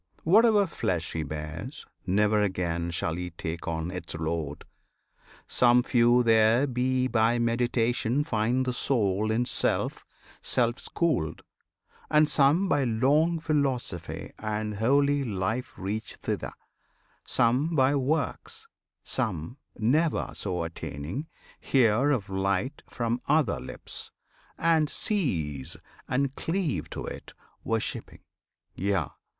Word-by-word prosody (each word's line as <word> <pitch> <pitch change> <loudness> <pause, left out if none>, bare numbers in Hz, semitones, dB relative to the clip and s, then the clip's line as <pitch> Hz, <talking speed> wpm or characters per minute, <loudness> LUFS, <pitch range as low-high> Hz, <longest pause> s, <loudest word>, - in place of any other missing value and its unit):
Whatever 210 +3 +5
flesh 90 - -2
he 80 - -1
bears, 80 - -6 0.2
never 105 +3 +3
again 85 -4 -1
Shall 85 -1 -2
he 90 0 -4
take 85 0 -6
on 80 +1 -2
its 90 -2 -6
load. 80 -2 -3 0.8
Some 125 0 +4
few 120 0 +4
there 115 +3 +4
be 130 0 0
By 115 0 +2
meditation 120 +2 +1
find 125 -1 0
the 125 - -1
Soul 110 -5 +1
in 115 +3 +1
Self - - 0 0.4
Self 120 -1 +1
schooled; 155 - -1 0.7
and 150 0 +5
some 150 +6 +3
by 145 -5 +2
long 140 +8 +2
philosophy 135 - -2
And 105 -1 -3
holy 140 +5 +3
life 110 +2 -2
reach 105 +2 -4
thither; - - -4 0.7
some 130 +7 +2
by 135 0 +4
works: 160 - -2 0.4
Some, 110 - -2 0.2
never 150 +9 +1
so 90 -4 -2
attaining, 80 - -5 0.3
hear 125 +1 +3
of 120 -9 0
light 100 +7 -1
From 120 +1 -2
other 150 -7 +2
lips, 65 - -4 0.5
and 160 -2 +3
seize, 80 - -1 0.3
and 135 +1 0
cleave 160 - -2
to - - -5
it - - -8 0.3
Worshipping; 115 -1 -3 0.5
yea! 100 +2 0
120 Hz, 115 wpm, -27 LUFS, 95-140 Hz, 0.8 s, Whatever